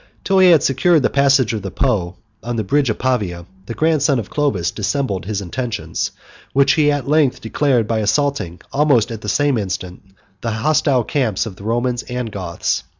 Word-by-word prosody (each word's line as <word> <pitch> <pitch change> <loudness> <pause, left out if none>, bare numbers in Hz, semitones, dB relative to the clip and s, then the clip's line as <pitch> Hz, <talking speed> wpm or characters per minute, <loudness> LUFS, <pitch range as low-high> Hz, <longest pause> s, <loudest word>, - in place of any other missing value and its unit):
Till 195 -1 +2
he 185 -1 +7
had 165 -4 +5
secured 150 +3 +3
the - - +1
passage 140 -4 +3
of 110 - -3
the 95 - -5
Po 95 -8 -1 0.3
on 120 0 -4
the 110 - -1
bridge 140 +6 +1
of 110 - -1
Pavia, 100 -10 -1 0.2
the 115 - -5
grandson 155 -3 +2
of 110 -5 -5
Clovis 100 - 0
dissembled 105 - -2
his 100 0 -3
intentions, 115 +4 -3 0.4
which 140 0 +4
he 150 -2 +3
at 145 -3 -2
length 150 -3 +2
declared, 120 -1 0
by 115 0 0
assaulting, 110 - -1
almost 135 -6 +3
at 110 -2 -6
the 105 - -4
same 145 +2 +1
instant, 95 -2 -5 0.4
the 115 - -2
hostile 135 +1 +2
camps 115 -7 -1
of 105 -5 -7
the 100 - -13
Romans 120 +2 -1
and 125 -2 -5
Goths. 90 -4 -2
120 Hz, 190 wpm, -19 LUFS, 105-140 Hz, 0.4 s, he